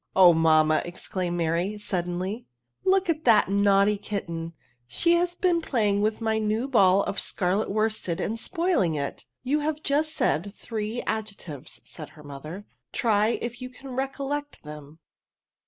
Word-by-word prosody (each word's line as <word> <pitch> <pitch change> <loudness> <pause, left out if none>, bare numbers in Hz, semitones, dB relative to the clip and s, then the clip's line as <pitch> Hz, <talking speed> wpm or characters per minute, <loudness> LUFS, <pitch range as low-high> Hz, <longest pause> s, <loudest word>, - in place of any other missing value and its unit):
" - - -45
Oh, 180 -2 +8
mamma/' 155 -1 +4
exclaimed 175 0 -4
Mary, 170 +5 0
sud 190 -4 -2
denly, 175 0 -3 0.2
• - - -9
*^ - - -25 0.4
look 380 0 +3
at 320 -2 0
that 215 -5 +5
naughty 200 +1 +4
kitten, 170 -5 -4 0.3
she 340 - +2
has 350 +1 +1
been 350 -2 +2
playing 210 -9 +1
with 215 +2 0
my 220 -1 +1
new 215 +4 0
ball 200 -7 +4
of - - -2
scarlet 195 +2 -1
worsted 215 -5 -1
and 225 +2 -2
spoiling 335 - +1
it." 140 -1 -4 0.2
You 280 +4 +1
have 305 +1 -2
just 305 +2 +1
said 200 +6 0
three 220 +1 -4
adjectives," 200 -10 -5
said 155 -3 -9
her 150 - -13
mother; 150 +7 -8
" - - -56
try 220 0 +2
if 240 +1 -5
you 255 - -5
can 270 +2 -12
recollect 275 +2 -3
them." 150 0 -10
210 Hz, 170 wpm, -26 LUFS, 175-255 Hz, 0.4 s, Oh